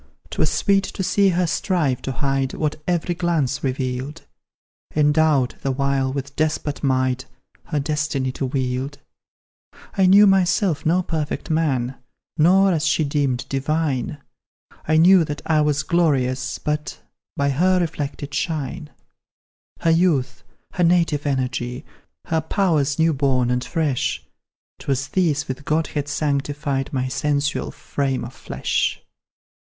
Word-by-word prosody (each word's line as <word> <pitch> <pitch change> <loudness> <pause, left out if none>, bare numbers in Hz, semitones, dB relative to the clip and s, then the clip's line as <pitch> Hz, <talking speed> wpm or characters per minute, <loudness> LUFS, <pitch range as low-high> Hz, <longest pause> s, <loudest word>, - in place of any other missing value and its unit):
"'Twas - - +1
sweet 195 -1 +2
to 190 - -4
see 200 +1 +3
her 180 0 +1
strive 160 - 0
to 135 - -3
hide 135 0 -1
What 155 0 -2
every 175 0 0
glance 170 -6 -1
revealed; 130 +3 -3 0.7
Endowed, 150 -3 +3
the 135 - -1
while, 135 0 0
with 140 0 -5
despot 155 -1 -1
might 130 -1 +1 0.4
Her 150 - -1
destiny 145 -2 -1
to 130 +1 -3
wield. 130 +1 -2 1.0
I 190 -1 +4
knew 200 +3 +8
myself 190 -4 +2
no 180 +3 +3
perfect 160 0 -3
man, 135 -5 0 0.4
Nor, 190 +5 +5
as 160 -3 +1
she 160 - +2
deemed, 140 -4 -1
divine; 140 0 -1 0.7
I 155 0 +3
knew 180 +2 +7
that 150 -2 -5
I 155 -2 +3
was 150 -1 +1
glorious 135 -7 +1
but 150 0 -3 0.4
By 140 0 +1
her 180 +6 +3
reflected 145 -3 -4
shine; 150 -2 -3 0.9
"Her 165 - +3
youth, 160 -7 +1 0.3
her 180 - 0
native 165 -4 +2
energy, 130 -2 -2 0.4
Her 160 -1 0
powers 155 -5 +1
new 160 0 +3
born 130 -3 +1
and 125 0 0
fresh, 150 -5 -1 0.6
'Twas 135 -1 -2
these 160 -6 +1
with 130 +2 -5
Godhead 150 -1 -1
sanctified 145 -2 -1
My 130 -2 -1
sensual 140 +2 -1
frame 135 -3 -3
of 120 - -9
flesh. - - -2
145 Hz, 130 wpm, -22 LUFS, 135-165 Hz, 1.0 s, knew